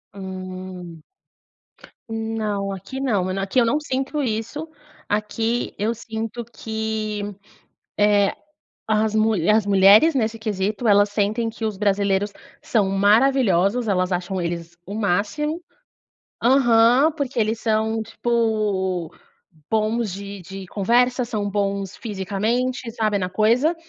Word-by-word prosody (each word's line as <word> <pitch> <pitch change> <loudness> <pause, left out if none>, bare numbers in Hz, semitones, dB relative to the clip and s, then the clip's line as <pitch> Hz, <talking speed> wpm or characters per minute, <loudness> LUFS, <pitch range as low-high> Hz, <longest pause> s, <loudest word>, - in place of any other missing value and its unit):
Hum, 185 -3 -8 1.1
não, 220 -3 -2
aqui 195 +8 -7
não. 205 -9 0
Aqui 195 +6 +1
eu 235 - +4
não 290 +6 +1
sinto 280 +1 -2
isso. 230 +7 -3 0.4
Aqui 225 +3 -1
eu 220 +3 0
sinto 225 +1 -5
que, 220 -2 -4 0.8
eh, 205 -1 +4 0.6
as 215 0 +1
mu 220 0 +3
as 215 0 +4
mulheres, 200 +9 +6
nesse 225 -3 0
quesito, 210 +1 -1
elas 205 0 +5
sentem 215 +3 0
que 225 0 -6
os 215 -3 -2
brasileiros 200 0 +1 0.3
são 210 -4 +1
maravilhosos, 210 +1 +3
elas 185 -2 +1
acham 180 +1 -2
eles 170 0 -4
o 200 - -7
máximo 215 - -1 0.8
Aham, 245 +2 +5
porque 280 -5 -4
eles 220 0 0
são 220 0 0
tipo, 210 -7 -1 0.6
bons 220 -1 0
de 200 0 -7
de 190 +2 -8
conversa, 245 +6 +2
são 210 -4 -2
bons 200 -1 -2
fisicamente, 225 +5 -2
sabe, 215 -3 0
na 180 -2 -2
coisa, 235 - +2
215 Hz, 120 wpm, -22 LUFS, 195-230 Hz, 1.1 s, mulheres